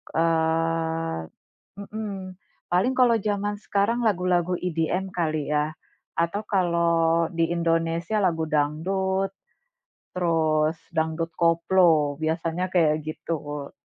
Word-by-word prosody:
Eee 165 - 0 0.5
mhm, 200 -2 -7 0.3
paling 190 +9 +2
kalau 245 -2 +5
jaman 205 0 -1
sekarang 210 +3 0
lagu-lagu 180 -2 +1
EDM 180 +2 -2
kali 155 -3 -1
ya? 150 +1 0 0.4
Atau 170 +6 -1
kalau 170 -3 +2
di 165 0 +1
Indonesia 165 +4 0
lagu 165 -3 +1
dangdut, 190 +6 0 0.8
terus 160 -3 +1 0.2
dangdut 160 +1 -1
koplo, 165 -3 +3
biasanya 165 +3 -1
kayak 160 -4 +3
gitu. 150 -2 -5
165 Hz, 95 wpm, -25 LUFS, 160-185 Hz, 0.8 s, kalau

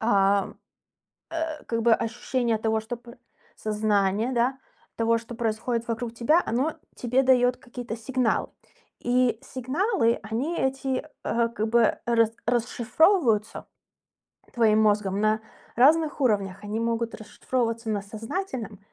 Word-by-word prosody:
а, 200 -3 +2 0.8
э, 320 -2 -4
как 230 -1 -1
бы 230 0 +5
ощущение 235 0 -1
того, 220 0 0
что 240 +2 -5
п 235 0 -14
э, 240 - -14 0.4
сознание, 210 +1 0
да, 250 +3 +1 0.4
того, 230 0 +2
что 230 +1 -8
происходит 230 +1 -2
вокруг 230 0 -3
тебя, 275 +9 +3
оно 270 +7 0 0.2
тебе 250 +2 +1
даёт 250 -1 +4
какие-то 245 -2 -7
сигналы. 245 0 0 0.5
И 245 -2 +1
сигналы, 260 - 0
они 250 +11 -2
эти, 265 0 -1 0.2
э, 235 0 +1
как 220 -1 -2
бы, 235 -1 +3
рас 230 -2 +3
расшифровываются 240 - +2 0.9
твоим 220 -3 +4
мозгом 205 -2 +2
на 215 0 +2 0.4
разных 300 +4 +4
уровнях. 200 -6 0
Они 210 +2 -3
могут 230 0 -1
расшифровываться 230 +2 -3
на 205 -2 -1
сознательном 225 - -5
235 Hz, 125 wpm, -26 LUFS, 220-255 Hz, 0.9 s, бы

